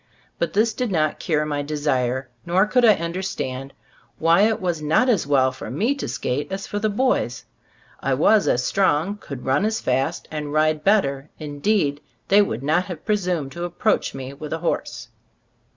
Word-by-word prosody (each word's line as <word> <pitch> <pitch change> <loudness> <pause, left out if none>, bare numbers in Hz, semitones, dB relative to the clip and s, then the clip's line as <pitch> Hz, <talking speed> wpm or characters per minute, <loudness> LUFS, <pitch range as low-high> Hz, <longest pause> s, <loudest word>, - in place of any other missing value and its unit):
But - - -1
this 220 +2 +2
did 250 -3 -2
not 155 -4 0
cure 150 -2 0
my 145 -1 -2
de 150 +1 -4
sire; 130 -3 0 0.2
nor 185 - +3
could 250 +3 +2
I 220 -3 +7
understand 170 -7 -4 0.5
why 165 +3 +4
it 225 - 0
was 175 -4 -2
not 160 - +2
as 205 - +2
well 130 -2 +3
for 130 - -8
me 235 +7 +1
to 280 - -5
skate 145 +8 -3
as 195 0 -4
for 205 - -3
the 215 +1 +1
boys; 205 - 0 0.5
I 135 - 0
was 205 +9 +4
as 125 - +2
strong, 190 +2 +1
could 140 -10 -9
run 135 +6 +2
as 220 +1 0
fast 130 +1 -1
and 150 -2 -4
ride 155 0 +2
better, 150 -9 +2
indeed 150 0 0 0.3
they 200 +2 +6
would 130 - -2
not 155 +6 +2
have 175 -5 -8
presumed 180 -9 -1
to 170 +3 -6
approach 175 +2 0
me 135 0 -6
with 150 +2 -7
a - - -1
horse. 120 -6 -2
155 Hz, 185 wpm, -22 LUFS, 140-200 Hz, 0.5 s, I